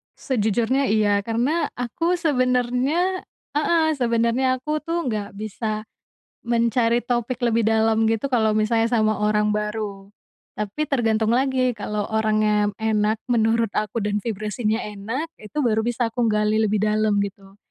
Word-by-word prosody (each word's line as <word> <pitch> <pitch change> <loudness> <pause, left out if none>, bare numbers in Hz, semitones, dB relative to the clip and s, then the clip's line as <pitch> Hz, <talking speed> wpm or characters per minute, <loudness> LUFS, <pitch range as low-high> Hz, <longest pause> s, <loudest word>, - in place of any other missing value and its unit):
Sejujurnya 240 +3 0
iya, 205 -1 +2
karena 245 +10 0
aku 330 +9 -1
sebenarnya 270 +4 +1 0.3
heeh, 320 +1 +2
sebenarnya 235 +1 +1
aku 305 +3 -1
tuh 335 +2 -2
nggak 205 -2 -4
bisa 215 +1 -4 0.6
mencari 235 0 +2
topik 245 +1 -2
lebih 230 -2 +2
dalam 220 0 +3
gitu 225 +5 -1
kalau 220 -3 +3
misalnya 225 +1 +2
sama 215 -2 +1
orang 210 0 +2
baru, 210 -2 -3 0.5
tapi 210 +9 -3
tergantung 225 -5 +1
lagi 260 -1 +1
kalau 210 -1 -3
orangnya 215 -1 +2
yang - - -16
enak 215 0 +1
menurut 230 -1 +2
aku 215 +2 -1
dan 205 0 -1
vibrasinya 215 +1 -2
enak, 220 +10 -4
itu 215 +7 -8
baru 220 -4 +1
bisa 240 0 0
aku 235 +1 -1
gali 210 0 +1
lebih 210 -1 +1
dalam 215 -1 +2
gitu. 195 0 -6
225 Hz, 140 wpm, -23 LUFS, 215-250 Hz, 0.6 s, dalam